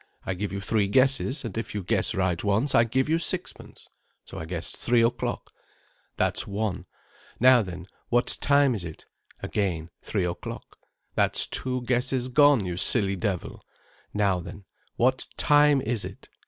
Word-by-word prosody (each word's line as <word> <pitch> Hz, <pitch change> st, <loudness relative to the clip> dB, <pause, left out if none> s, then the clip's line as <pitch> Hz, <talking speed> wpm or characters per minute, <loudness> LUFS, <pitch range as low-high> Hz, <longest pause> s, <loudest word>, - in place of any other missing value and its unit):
I 95 Hz, -, -2 dB
give 100 Hz, +2 st, -4 dB
you 100 Hz, -, -4 dB
three 105 Hz, 0 st, 0 dB
guesses, 130 Hz, +4 st, +2 dB
and 110 Hz, -, -6 dB
if 115 Hz, -1 st, -6 dB
you 105 Hz, -, -3 dB
guess 95 Hz, -, +1 dB
right 95 Hz, -3 st, 0 dB
once 110 Hz, +7 st, +1 dB
I 115 Hz, -, +5 dB
give 130 Hz, +3 st, 0 dB
you 160 Hz, +2 st, +1 dB
sixpence.' 180 Hz, +1 st, -4 dB, 0.4 s
So -, -, -9 dB
I 80 Hz, -, -6 dB
guessed 85 Hz, 0 st, -4 dB
three 120 Hz, -1 st, +2 dB
o'clock. 115 Hz, +1 st, -2 dB, 0.7 s
'That's -, -, 0 dB
one. 100 Hz, -1 st, -3 dB, 0.5 s
Now 130 Hz, 0 st, +6 dB
then, 90 Hz, -3 st, -7 dB, 0.2 s
what 120 Hz, +1 st, +2 dB
time 140 Hz, -2 st, +4 dB
is 105 Hz, -6 st, -4 dB
it? 80 Hz, -2 st, -9 dB, 0.4 s
'Again, 90 Hz, -5 st, -2 dB
three 100 Hz, -4 st, -2 dB
o'clock. 85 Hz, 0 st, -7 dB, 0.3 s
'That's -, -, +2 dB
two 130 Hz, -1 st, -2 dB
guesses 125 Hz, +1 st, 0 dB
gone, 145 Hz, -4 st, +4 dB
you 90 Hz, -1 st, -4 dB
silly 100 Hz, 0 st, +2 dB
devil. 95 Hz, -2 st, -3 dB, 0.5 s
Now 100 Hz, -3 st, +1 dB
then, 95 Hz, +3 st, -10 dB, 0.3 s
what 130 Hz, +2 st, +1 dB
time 145 Hz, -1 st, +4 dB
is 115 Hz, -2 st, -1 dB
it? -, -, -10 dB
110 Hz, 160 wpm, -26 LUFS, 95-130 Hz, 0.7 s, Now